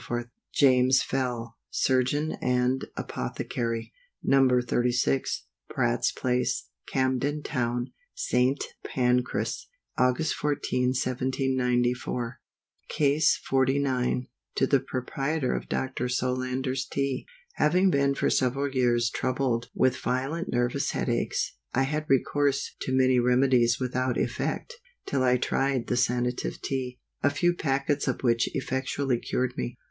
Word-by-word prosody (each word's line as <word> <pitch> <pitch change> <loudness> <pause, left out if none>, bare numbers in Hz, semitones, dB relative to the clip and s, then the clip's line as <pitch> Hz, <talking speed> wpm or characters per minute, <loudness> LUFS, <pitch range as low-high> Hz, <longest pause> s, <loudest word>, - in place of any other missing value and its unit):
JAMES 130 -1 +5
FELL, 120 -3 -3
Surgeon 130 +4 +1
and 125 +1 +1
Apothecary. 115 - -3 0.3
No. 135 -1 +5
36, 120 - 0 0.2
Pratt's - - +1
place, 125 0 -1 0.2
Camden 135 +3 0
Town, 120 -2 -2 0.2
St. 135 - +1 0.3
Pancras, 125 -1 0 0.3
Aug. 125 +5 +2
14, 130 -4 0
1794. 125 -2 0 0.5
CASE 150 +1 +3
XLIX. 130 -1 +1 0.3
To - - +3
the 140 0 +3
Proprietor 135 +3 -2
of - - -5
Dr. 130 -1 -2
SOLANDER'S 130 +1 -1
TEA. 135 -2 -2 0.3
HAVING 180 +5 +4
been 140 -1 +2
for - - +1
several 135 +2 +1
years 120 -3 +2
troubled 125 -2 -1
with 130 0 +3
violent 135 +9 -2
nervous 120 0 0
head - - -1
aches, - - -1 0.2
I 135 - +3
had 155 +3 -2
recourse 140 +1 +1
to - - -2
many 130 -1 +4
remedies 125 -1 +3
without 130 0 -1
effect, 480 - -2 0.3
till 140 - 0
I 125 -1 +4
tried 135 0 0
the - - -1
Sanative 125 0 0
Tea, 125 -2 -3 0.2
a 145 - +4
few 175 +5 +2
packets 140 -2 0
of - - -1
which 115 -1 +2
effectually 130 -1 -1
cured 125 +1 -1
me. 120 - -4
130 Hz, 115 wpm, -27 LUFS, 125-135 Hz, 0.5 s, JAMES